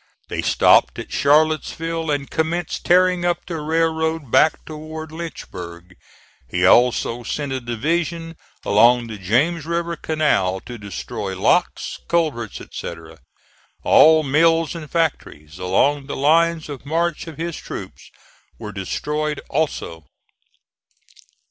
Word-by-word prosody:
They - - -2
stopped - - +4
at - - -7
Charlottesville 155 +2 +1
and 145 -2 -1
commenced 165 +2 -2
tearing 180 0 +4
up 175 0 -1
the 165 -3 -5
railroad 160 -2 -1
back 155 - +3
toward 155 0 -8
Lynchburg. 90 - -8 0.5
He 90 +6 +1
also 120 +2 +3
sent 140 +4 -4
a 130 -1 -2
division 165 +8 -2 0.3
along 120 +4 +4
the 110 -3 -8
James 140 - +1
River 170 0 -1
Canal 150 - 0
to 120 -2 -9
destroy 100 -1 -6
locks, 175 - +1
culverts 150 - -1
etc. 80 -1 -9 0.6
All 160 0 +6
mills 165 +3 +3
and 160 -3 -8
factories 90 - -2
along 135 +10 +1
the - - -5
lines 165 +3 +2
of 145 -4 -8
march 165 +3 -1
of 160 - -9
his 165 0 -4
troops - - -9 0.5
were 105 - -7
destroyed 150 +10 -3
also. 135 - -2
155 Hz, 120 wpm, -21 LUFS, 115-165 Hz, 0.6 s, All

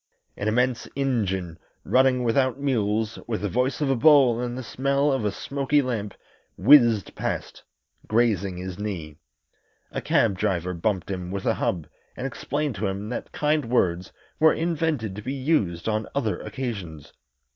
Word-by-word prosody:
An 100 - -3
immense 125 +2 +1
engine, 95 -11 -1 0.2
running 130 -1 +3
without 130 +2 +1
mules, 110 -5 0
with 110 -2 -2
the 105 - -1
voice 125 +7 0
of 145 - +1
a - - +3
bull 130 -3 +5
and 125 0 -3
the 130 - -5
smell 140 +4 +1
of 135 -4 0
a 105 - +1
smoky 140 +4 0
lamp, 115 -7 -2 0.4
whizzed 115 - +5
past, - - -4 0.5
grazing 105 -5 +1
his 90 +1 -6
knee. 85 -8 -5 0.7
A - - -3
cab 100 -5 +2
driver 90 0 0
bumped 95 +2 -1
him 90 -2 -4
with 95 +1 -4
a - - +3
hub 85 -4 -1 0.3
and 130 - -4
explained 145 +2 -2
to 100 +1 -1
him 100 +2 -4
that 125 - -5
kind 150 -1 +1
words 95 -7 0 0.3
were 160 0 +6
invented 160 - -1
to - - -5
be 130 +5 -4
used 130 - 0
on 110 0 -1
other 110 -10 0
occasions. 100 - -6
115 Hz, 160 wpm, -25 LUFS, 95-135 Hz, 0.7 s, were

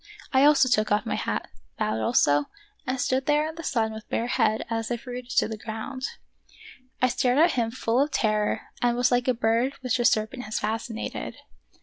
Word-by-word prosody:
I 265 +1 +6
also 295 -3 +6
took 215 -4 +2
off 210 - +2
my - - -2
hat, - - -2 0.3
bowed 110 +1 -1
also, 145 +6 +3 0.4
and 255 0 -1
stood 260 +1 0
there 300 +1 +3
in 320 - -6
the 330 - -8
sun 225 -6 0
with 220 0 -10
bare 230 - 0
head 225 -3 +1
as 225 -1 -2
if 240 0 -4
rooted 250 -1 -7
to - - +4
the 220 -1 -6
ground. 230 +5 -5 1.0
I - - +7
stared 255 0 +1
at 330 +3 +5
him 235 -4 0
full 235 +1 0
of 290 - +1
terror 215 -5 +1 0.2
and 240 0 +2
was 250 +1 +2
like 245 0 +2
a 255 - +4
bird 230 +4 +1
which 255 -1 0
a 240 - +1
serpent 220 +4 +1
has 215 - -3
fascinated. 220 - -4
240 Hz, 205 wpm, -26 LUFS, 220-260 Hz, 1.0 s, I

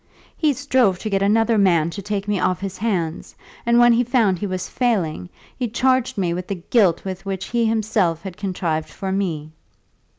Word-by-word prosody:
"He 310 -3 +2
strove 255 -8 +2
to 215 +3 -5
get 195 0 +1
another 225 +2 +3
man 170 -4 +3
to 200 - -6
take 205 0 -3
me 205 -2 0
off 185 0 0
his 195 -1 -6
hands; 180 -7 -2 0.3
and 235 0 +4
when 240 0 +6
he 240 +1 +3
found 230 -6 +2
that - - -14
he 205 - -2
was 185 -1 -3
failing, 175 - -1 0.3
he 250 - -2
charged 255 +1 +1
me 175 -3 0
with 180 +1 -5
the 200 - -2
guilt 180 0 +2
which 190 0 -4
he 235 -1 +1
himself 210 -7 0
had 190 -3 -7
contrived 175 -5 -2
for 190 -1 -5
me." 165 -6 -2
195 Hz, 195 wpm, -21 LUFS, 180-230 Hz, 0.3 s, when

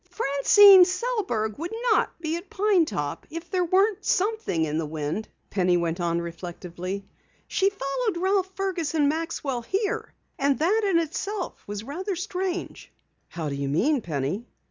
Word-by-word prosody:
"Francine 380 +5 +7
Sellberg 365 - -1
wouldn't 355 +8 -4 0.4
be 320 -1 -2
at 345 +3 -7
Pine 410 -5 +3
Top 145 - -4
if 330 +2 -7
something 360 -2 +1
weren't 405 - +1
in 155 +1 -1
the 165 - -2
wind," 155 +7 -3 0.2
Penny 180 -2 +2
went 170 0 -1
on 170 0 0
reflectively. 175 +3 -6 0.4
"She 390 - +2
followed 395 - -2
Ralph 380 +1 +1
Fergus 365 -5 -2
and 295 -2 +3
Maxwell 300 -5 -2
here. 395 - -2 0.3
And 280 0 +2
that 390 +8 +2
in 355 - +3
itself 355 +4 -3
was 205 +1 -5
rather 365 - -4
strange." 370 0 -4 0.4
"How 165 -3 -5
do 145 - -3
you 140 0 -2
mean, 250 - +2
Penny?" 165 - -3
320 Hz, 145 wpm, -25 LUFS, -, 0.4 s, Francine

